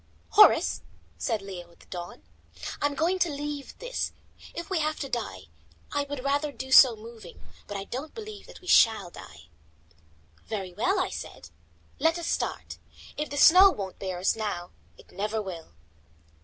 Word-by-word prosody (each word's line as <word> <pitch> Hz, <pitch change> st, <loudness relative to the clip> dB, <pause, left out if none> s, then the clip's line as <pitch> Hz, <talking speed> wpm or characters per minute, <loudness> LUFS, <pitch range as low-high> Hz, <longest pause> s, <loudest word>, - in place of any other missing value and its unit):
"Horace," -, -, +6 dB, 0.4 s
said 195 Hz, -, -1 dB
Leo 180 Hz, -3 st, -8 dB
at 170 Hz, -, -24 dB
the -, -, -18 dB
dawn, 175 Hz, -1 st, -8 dB, 0.6 s
"I 290 Hz, -, +4 dB
am 285 Hz, -, -5 dB
going 345 Hz, +5 st, +1 dB
to 350 Hz, -1 st, +2 dB
leave 290 Hz, -1 st, -5 dB
this. -, -, -3 dB, 0.4 s
If 340 Hz, -, -5 dB
we 375 Hz, -4 st, 0 dB
have 310 Hz, 0 st, -1 dB
to 275 Hz, -, -4 dB
die, 220 Hz, -, -3 dB, 0.5 s
I 285 Hz, 0 st, 0 dB
would 285 Hz, -3 st, -5 dB
rather 285 Hz, +2 st, 0 dB
do 265 Hz, +1 st, -8 dB
so 255 Hz, -3 st, +9 dB
moving; 225 Hz, +1 st, -12 dB, 0.3 s
but 205 Hz, -, -4 dB
I 195 Hz, -, -4 dB
don't 265 Hz, +9 st, -6 dB
believe 430 Hz, -2 st, -9 dB
that -, -, -13 dB
we 365 Hz, -, -15 dB
shall 220 Hz, -, +5 dB
die." 75 Hz, -, -13 dB, 1.0 s
"Very 195 Hz, -5 st, -4 dB
well," 370 Hz, -, +1 dB
I 370 Hz, -, 0 dB
said, -, -, -8 dB, 0.5 s
"let 325 Hz, +1 st, +3 dB
us 340 Hz, -, -5 dB
start. -, -, -3 dB, 0.4 s
If 300 Hz, -, -3 dB
the 285 Hz, -, -5 dB
snow 365 Hz, +6 st, +9 dB
won't 195 Hz, -, -5 dB
bear 185 Hz, -2 st, -4 dB
us 180 Hz, +2 st, +1 dB
now, 205 Hz, -5 st, -4 dB, 0.3 s
it -, -, -18 dB
never 210 Hz, +2 st, -2 dB
will." 170 Hz, -, -7 dB
255 Hz, 175 wpm, -27 LUFS, 195-310 Hz, 1.0 s, so